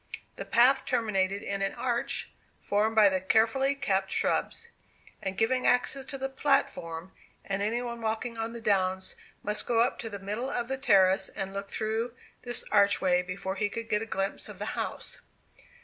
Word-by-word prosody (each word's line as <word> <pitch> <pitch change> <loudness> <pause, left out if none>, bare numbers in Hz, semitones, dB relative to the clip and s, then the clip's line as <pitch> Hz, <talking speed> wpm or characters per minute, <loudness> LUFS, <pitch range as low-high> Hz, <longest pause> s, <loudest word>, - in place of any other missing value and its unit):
The - - -6
path 255 +3 +5
terminated 200 -5 0
in 200 0 -3
an 195 - -1
arch, 240 -2 -2 0.3
formed 215 +2 +1
by 215 -2 +7
the 190 -1 +1
carefully 230 +8 +3
kept 195 -8 0
shrubs, 470 - -1 0.5
and 190 0 -3
giving 255 +4 +2
access 260 +2 +2
to 275 - -5
the 270 0 -2
platform; 190 - 0 0.3
and 195 0 -2
any 230 +4 0
one 235 -1 -5
walking 225 +2 -2
on 225 0 -3
the 235 - -7
downs 190 -3 +1 0.3
must 210 +1 -1
go 230 -2 +3
up 245 +3 +1
to 230 -4 -4
the 205 - -6
middle 210 +7 -3
of 240 -1 -2
the 265 - -1
terrace 195 -6 +4
and 195 0 -5
look 200 0 -5
through 220 +3 -2 0.3
this 240 -1 -1
archway 200 -3 +4
before 190 +1 -5
he 205 - 0
could 230 +2 -6
get 210 - +1
a 225 - -5
glimpse 195 -2 -3
of - - -9
the - - -4
house. - - -4
220 Hz, 180 wpm, -29 LUFS, 195-240 Hz, 0.5 s, by